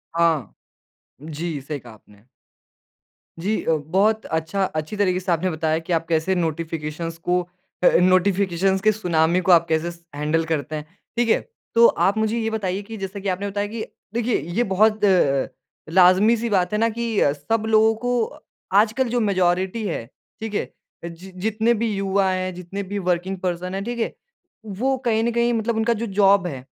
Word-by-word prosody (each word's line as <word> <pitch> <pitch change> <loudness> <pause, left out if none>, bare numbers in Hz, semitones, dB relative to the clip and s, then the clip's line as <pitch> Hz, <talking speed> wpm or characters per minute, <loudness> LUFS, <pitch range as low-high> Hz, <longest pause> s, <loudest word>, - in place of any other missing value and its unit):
हाँ। 165 -8 +1 0.7
जी, 155 0 -4
सही 145 +1 -5
कहा 120 -2 -13
आपने। 105 -1 -20 1.2
जी 205 +6 -1
अ, - - +1
बहुत 190 +9 +1
अच्छा 160 +5 -1
अच्छी 155 +2 -4
तरीके 185 -3 +2
से 185 -1 -2
आपने 170 +3 +1
बताया 160 0 0
कि 175 - 0
आप 165 0 0
कैसे 165 +3 +1
नोटिफिकेशंस 165 -1 -3
को 180 +2 0 0.4
अ, - - +7
नोटिफिकेशंस 190 0 +2
के 215 +1 +4
सुनामी 175 -4 +1
को - - +8
आप 170 -1 +5
कैसे 160 +2 0
स 170 - -16
हैंडल 155 +2 0
करते 155 0 -2
हैं, 150 -1 -5 0.3
ठीक 240 -1 +2
है? - - +4 0.4
तो 230 0 +7
आप 200 +3 +1
मुझे 220 +1 0
ये 225 -1 -1
बताइए 200 -3 -2
कि 220 +2 -9
जैसा 195 0 -5
कि 195 0 -3
आपने 190 +2 -2
बताया 205 +1 -2
कि 220 +1 -6 0.3
देखिए, 235 0 +1
ये 175 +11 -1
बहुत 215 +2 +3
अ - - +5
अ, 140 -8 +3 0.5
लाज़मी 185 +5 +6
सी 235 +1 -2
बात 190 -3 +1
है - - +2
ना 230 - +3
कि 230 -1 -2
सब 220 +9 -2
लोगों 220 0 +4
को 245 0 -2 0.4
आजकल 225 +5 +3
जो 245 +1 0
मेजॉरिटी 190 0 +1
है, 115 - -3 0.4
ठीक 220 -1 -5
है? - - -2 0.4
जि 170 +3 -9
जितने 220 +2 +2
भी 230 -1 -1
युवा 195 0 +1
हैं, 185 0 -2
जितने 180 +3 -6
भी 200 +1 -4
वर्किंग 180 +1 -1
पर्सन 180 0 -3
हैं, 195 - -3
ठीक 240 +2 -4
है? 225 - -1 0.5
वो 245 +7 -1
कहीं 225 -1 +2
न 235 - +1
कहीं 235 0 +1
मतलब 230 0 -1
उनका 230 +1 +2
जो 235 - -1
जॉब 195 -2 +5
है, 135 -6 -6
190 Hz, 190 wpm, -22 LUFS, 170-220 Hz, 1.2 s, को